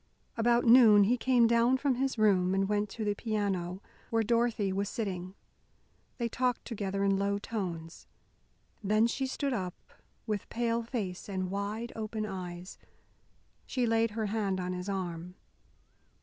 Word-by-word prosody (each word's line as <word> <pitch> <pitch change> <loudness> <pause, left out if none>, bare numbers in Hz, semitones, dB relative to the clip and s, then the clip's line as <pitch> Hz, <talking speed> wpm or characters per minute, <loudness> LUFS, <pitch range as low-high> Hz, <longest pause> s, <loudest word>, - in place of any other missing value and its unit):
About 235 +1 +2
noon 230 -4 +8
he 225 +5 +3
came 250 -1 +3
down 235 +2 +4
from 275 0 +1
his 260 0 -1
room 190 -4 +3
and 195 0 +1
went 210 0 0
to 220 +1 -5
the 205 - +1
piano, 200 -4 -2 0.3
where 225 -1 +2
Dorothy 230 -3 +1
was 200 +1 -1
sitting. 185 -4 -4 0.8
They 235 - -1
talked 250 +1 -1
together 200 -3 -3
in 195 -1 +2
low 200 0 0
tones. 175 -7 -5 0.8
Then 215 +3 +3
she 265 +3 -1
stood 275 +1 -2
up, 185 -6 -3 0.5
with 210 -3 -3
pale 235 0 0
face 215 -6 -5
and 185 -2 -3
wide 210 +4 -3
open 215 0 -3
eyes. 180 -2 -7 0.9
She 250 -2 0
laid 225 0 +2
her 220 - 0
hand 200 -3 -1
on 180 0 -3
his 180 +2 -5
arm. 180 -2 -4
210 Hz, 150 wpm, -30 LUFS, 190-235 Hz, 0.9 s, noon